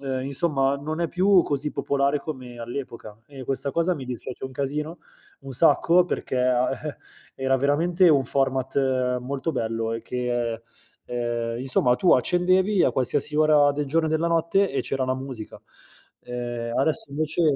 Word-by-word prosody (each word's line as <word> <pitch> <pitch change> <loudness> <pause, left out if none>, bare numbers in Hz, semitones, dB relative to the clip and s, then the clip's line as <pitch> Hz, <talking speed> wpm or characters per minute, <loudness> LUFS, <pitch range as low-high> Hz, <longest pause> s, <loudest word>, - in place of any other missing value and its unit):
ehm, 130 -1 -3
insomma 140 -1 +1
non 155 +4 -4
è 170 - +1
più 185 +1 +4
così 145 +1 -2
popolare 140 +1 0
come 130 -5 -8
all'epoca 115 -3 -7
e 135 -2 -9
questa 135 +2 -2
cosa 170 +4 +1
mi 140 -5 -7
dispiace 125 0 -7
un 130 - -5
casino, 150 +5 -3 0.4
un 135 - -8
sacco 170 +5 +4
perché 130 - -3
a 125 0 +2 0.2
eh, 145 - -7 0.4
era 135 0 +1
veramente 165 +7 +3
un 140 -4 +4
format 130 -1 0
molto 140 +5 -3
bello 115 -3 -2
e 115 - -4
che, 120 -2 -2 0.4
ehm, 120 -1 -3
insomma 130 -1 +2
tu 180 +8 +4
accendevi 185 - +2
a - - +4
qualsiasi 135 +4 -1
ora 150 -2 +5
del 145 0 -2
giorno 160 +3 +1
e - - -3
della 160 +1 +1
notte 170 +4 +2
e 140 - 0
c'era 135 -1 -2
la 130 - 0
musica. 130 -4 -7 0.7
Ehm, 120 -1 -4
adesso 140 0 0
invece 155 +3 -1
135 Hz, 165 wpm, -24 LUFS, 125-155 Hz, 0.7 s, ora